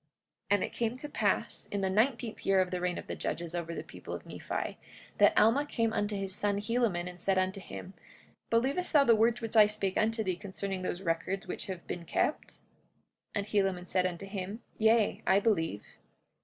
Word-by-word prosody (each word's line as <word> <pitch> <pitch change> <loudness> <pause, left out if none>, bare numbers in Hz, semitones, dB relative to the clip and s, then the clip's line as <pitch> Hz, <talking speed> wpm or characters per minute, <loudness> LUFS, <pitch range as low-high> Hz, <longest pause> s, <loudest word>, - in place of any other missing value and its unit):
45:2 150 - -46 0.5
And 200 - 0
it - - -4
came 235 +1 -1
to 295 - -6
pass - - -1
in 200 - -1
the 190 - +1
nineteenth 230 +2 +1
year 195 -1 +4
of 185 -1 +1
the 180 -1 -2
reign 180 -1 0
of - - -6
the - - -5
judges 170 -1 -3
over 170 -1 -3
the - - -4
people - - -8
of - - -9
Nephi, - - -4 0.4
that - - +6
Alma 230 +7 +5
came 230 -6 -1
unto 205 0 0
his 195 -1 -2
son 205 0 0
Helaman 210 -5 0
and 180 -1 -9
said 195 0 +2
unto 190 +1 0
him: 185 0 -8 0.6
Believest 270 +11 +1
thou 290 -2 +7
the 235 -4 +6
words 230 +2 +3
which 225 0 -3
I 215 -2 +8
spake 205 -3 -1
unto 220 +1 +1
thee 185 -3 -1
concerning 195 -1 -4
those 185 0 -3
records 185 +4 -1
which - - -5
have 185 -3 -6
been 170 -1 -5
kept? - - 0
45:3 - - -13 0.7
And 200 -1 0
Helaman 195 -4 0
said 185 0 +2
unto 180 +1 -6
him: 195 +3 -5 0.2
Yea, 220 0 +3
I 190 +1 +6
believe. 165 - 0
200 Hz, 210 wpm, -31 LUFS, 185-225 Hz, 0.7 s, I